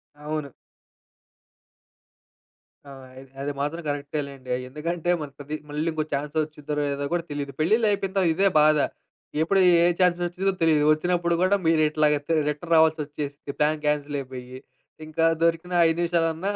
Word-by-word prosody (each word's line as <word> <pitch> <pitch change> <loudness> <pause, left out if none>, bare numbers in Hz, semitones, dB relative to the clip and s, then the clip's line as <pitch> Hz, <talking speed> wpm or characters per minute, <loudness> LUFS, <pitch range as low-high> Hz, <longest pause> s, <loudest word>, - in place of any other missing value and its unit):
అవును. 150 -1 -5 2.4
ఆ! - - -10 0.3
ఇద్ 135 - -15
అది 145 +1 -2
మాత్రం 155 +4 -2
కరెక్టే 145 +1 -2
లెండి. 135 -2 -12
ఆహ్, 125 - -4
ఎందుకంటే, 170 +4 -3
మనకి 145 +1 -7
మళ్ళీ 150 +3 -2
ఇంకో 155 -1 -1
ఛాన్స్ 145 +2 -3
వచ్చిద్దో 150 -1 -7
లేదో 145 -1 -1
కూడా 175 -1 0
తెలీదు. 145 -1 -4
పెళ్లిళ్లు 215 +8 +3
అయిపోయిన 195 -2 -1
తర్వాత 190 -3 +3
ఇదే 195 +2 +3
బాధ. 155 0 +5 0.6
ఎప్పుడు 195 +4 +2 0.2
ఏ - - +5 0.2
ఛాన్స్ 180 -1 +3
వచ్చిద్దో 190 +3 -1
తెలీదు. 155 -2 +4
వచ్చినప్పుడు 170 +1 0
కూడా 185 +2 +4
మీరిట్లాగా 155 -2 +3
తి 165 - +1
రిటర్న్ 150 +3 -4
రావాల్సొచ్చేసింది 150 -3 0
ప్లాన్ 150 +1 +2
క్యాన్సిల్ 150 -1 0
అయిపోయి. 130 -1 -8 0.5
ఇంక 155 +1 -11 0.2
దొరికిన 170 +2 0
5 165 +1 0
నిమిషాలన్నా, 170 +2 0
155 Hz, 145 wpm, -25 LUFS, 145-170 Hz, 2.4 s, బాధ